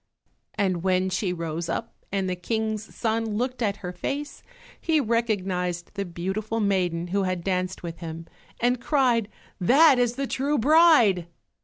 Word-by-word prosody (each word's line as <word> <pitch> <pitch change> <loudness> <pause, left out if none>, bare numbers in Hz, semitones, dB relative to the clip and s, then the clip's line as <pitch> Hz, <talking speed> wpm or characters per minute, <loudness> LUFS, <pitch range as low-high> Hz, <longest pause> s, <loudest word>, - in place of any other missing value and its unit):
And 185 -4 0
when 185 0 +1
she 185 0 -1
rose 165 -1 -4
up - - -3 0.2
and 195 -1 -1
the 185 - -1
King's 220 +3 -2
son 225 -2 -1
looked 250 +2 -2
at 205 -3 0
her 180 - -3
face 285 +11 -4 0.4
he 320 -2 +2
recognized 190 -8 -1
the 200 -1 -3
beautiful 190 +6 -3
maiden 180 -4 0
who 200 +2 +1
had 185 -2 -2
danced 185 -1 -2
with 170 -1 -6
him 165 -1 -7 0.3
and 245 0 +1
cried, 245 -7 +2 0.3
"That 270 - +6
is 245 -1 +1
the 275 - -2
true 280 +3 0
bride!" 265 - +5
200 Hz, 155 wpm, -25 LUFS, 180-240 Hz, 0.4 s, That